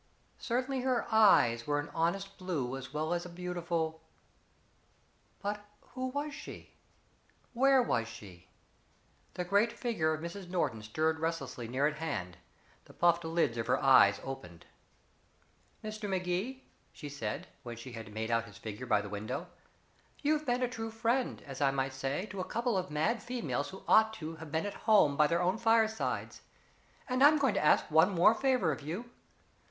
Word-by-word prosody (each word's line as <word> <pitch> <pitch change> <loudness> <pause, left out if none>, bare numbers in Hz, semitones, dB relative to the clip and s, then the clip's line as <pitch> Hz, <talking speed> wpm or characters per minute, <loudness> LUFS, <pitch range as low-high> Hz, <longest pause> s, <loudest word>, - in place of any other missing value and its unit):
Certainly 255 +3 -1
her 255 -2 +1
eyes 120 - +5
were 145 0 +1
an 145 - -5
honest 195 +5 -1
blue 150 -9 -2
as 135 -1 -8
well 155 +3 -1
as 175 0 -1
a 180 - -8
beautiful 170 -2 -3 1.4
but 205 +1 -3 0.3
who 255 0 -2
was 285 +3 -3
she? - - -10 0.8
Where 265 +1 +5
was 115 - 0
she? 95 -6 -12 0.9
The 180 - -2
great 200 +5 +3
figure 215 -11 -1
of 155 - -2
Mrs. 175 +3 -7
Norton 170 -11 -1
stirred 155 +9 0
restlessly 160 -7 -3
near 130 +4 0
at 150 0 0
hand; 90 - -4 0.5
the - - -17
puffed 170 0 +3
lids 160 -8 0
of 115 - -2
her - - +2
eyes - - +6
opened. 90 -11 -8 1.2
"Mr. 215 -1 -5
Magee," 190 +8 -2 0.3
she 150 - -9
said, 125 -7 -4 0.2
when 120 -3 -7
she 125 +3 -9
had 115 -3 -8
made 110 +2 -3
out 115 0 +1
his - - -13
figure 110 +3 -7
by 105 -3 +3
the 105 - -7
window, 105 +1 -5 0.7
"you've 305 0 +1
been 245 +1 +1
a - - +2
true 225 -2 -5
friend, 235 +3 -1
as 135 -1 -8
I 140 - +4
might 135 -1 -1
say, 135 +7 -2
to 195 - -6
a - - -1
couple 235 +3 -1
of 185 -1 -1
mad 160 +11 0
females 240 - -3
who 190 - -10
ought 220 0 +5
to 160 -2 -7
have 160 -2 -10
been 160 +3 0
at 205 - -3 0.2
home 155 -10 +6
by 150 +1 +5
their 170 +3 +1
own 185 +5 +1
firesides, 225 -1 +1 0.7
and 255 0 +2
I'm 300 +2 +8
going 270 -6 +2
to - - 0
ask 150 - +4
one 160 +5 +6
more 185 +3 +5
favor 250 - +2
of 150 - -4
you. 185 +12 -6
170 Hz, 175 wpm, -32 LUFS, 140-220 Hz, 1.4 s, I'm